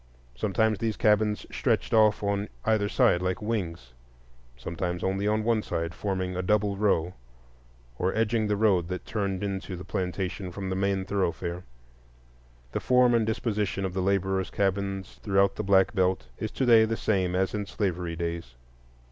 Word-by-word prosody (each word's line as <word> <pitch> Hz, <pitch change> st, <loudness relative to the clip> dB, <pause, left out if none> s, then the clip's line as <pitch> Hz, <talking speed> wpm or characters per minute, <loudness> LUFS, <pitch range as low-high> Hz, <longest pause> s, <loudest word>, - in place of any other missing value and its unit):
Sometimes 105 Hz, -, +1 dB
these 110 Hz, -2 st, -1 dB
cabins 105 Hz, 0 st, +2 dB
stretched -, -, 0 dB
off 110 Hz, -2 st, +4 dB
on 100 Hz, 0 st, -1 dB, 0.2 s
either 110 Hz, -2 st, +2 dB
side 85 Hz, -, +3 dB
like 90 Hz, 0 st, -1 dB
wings; 85 Hz, -, -4 dB, 0.6 s
sometimes 85 Hz, +6 st, -4 dB
only 95 Hz, +2 st, 0 dB
on 110 Hz, +1 st, +1 dB
one 115 Hz, -1 st, +2 dB
side, 85 Hz, -4 st, -3 dB
forming 95 Hz, -2 st, -2 dB
a 90 Hz, -, -1 dB
double 105 Hz, +1 st, +1 dB
row, 95 Hz, -4 st, +1 dB, 0.9 s
or 90 Hz, +1 st, +1 dB
edging 110 Hz, 0 st, +1 dB
the 105 Hz, -1 st, 0 dB
road 100 Hz, -5 st, +3 dB
that 90 Hz, 0 st, -5 dB
turned 100 Hz, -3 st, -2 dB
into 95 Hz, -1 st, -3 dB
the 90 Hz, -, -9 dB
plantation 95 Hz, -1 st, -3 dB
from 95 Hz, +1 st, -5 dB
the -, -, -1 dB
main 95 Hz, 0 st, 0 dB
thoroughfare. 90 Hz, -2 st, -2 dB, 1.1 s
The -, -, -2 dB
form 125 Hz, -1 st, +4 dB
and 115 Hz, -2 st, +2 dB
disposition 105 Hz, -3 st, -1 dB
of 95 Hz, -, -3 dB
the 95 Hz, -, -1 dB
laborers' 95 Hz, 0 st, 0 dB
cabins 100 Hz, 0 st, -2 dB
throughout 100 Hz, -1 st, +2 dB
the -, -, -2 dB
Black 95 Hz, -1 st, +4 dB
Belt 95 Hz, -, 0 dB
is 110 Hz, -, -2 dB
to 130 Hz, -, -1 dB
day 115 Hz, -2 st, +7 dB
the 115 Hz, 0 st, -2 dB
same 95 Hz, -4 st, 0 dB
as 95 Hz, +1 st, +1 dB
in 105 Hz, -1 st, -3 dB
slavery 90 Hz, -5 st, -2 dB
days. 85 Hz, -7 st, -4 dB
95 Hz, 165 wpm, -27 LUFS, 90-105 Hz, 1.1 s, day